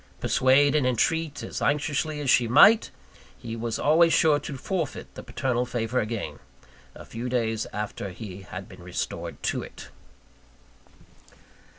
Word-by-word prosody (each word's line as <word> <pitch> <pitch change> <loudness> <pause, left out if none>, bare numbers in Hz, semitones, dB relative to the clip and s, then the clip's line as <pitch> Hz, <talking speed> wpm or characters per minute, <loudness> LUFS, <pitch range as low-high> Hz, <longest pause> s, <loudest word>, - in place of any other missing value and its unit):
Persuade 135 +2 +3
and 150 -4 +2
entreat 150 +4 0
as - - -5
anxiously 150 +1 0
as 140 - -2
she 120 - +4
might, 205 - +6 0.5
he 115 -1 -7
was 115 0 -3
always 165 +3 +4
sure 155 -2 +4
to 140 - -7
forfeit 165 +1 -4
the - - -8
paternal 125 0 -1
favour 120 0 -2
again, 110 0 -4 0.6
a - - -11
few 120 +2 -5
days 115 -3 -1
after 105 -1 -4
he 95 0 -9
had 95 - -8
been - - -14
restored - - -5
to - - -1
it. - - -11
125 Hz, 145 wpm, -26 LUFS, 115-150 Hz, 0.6 s, might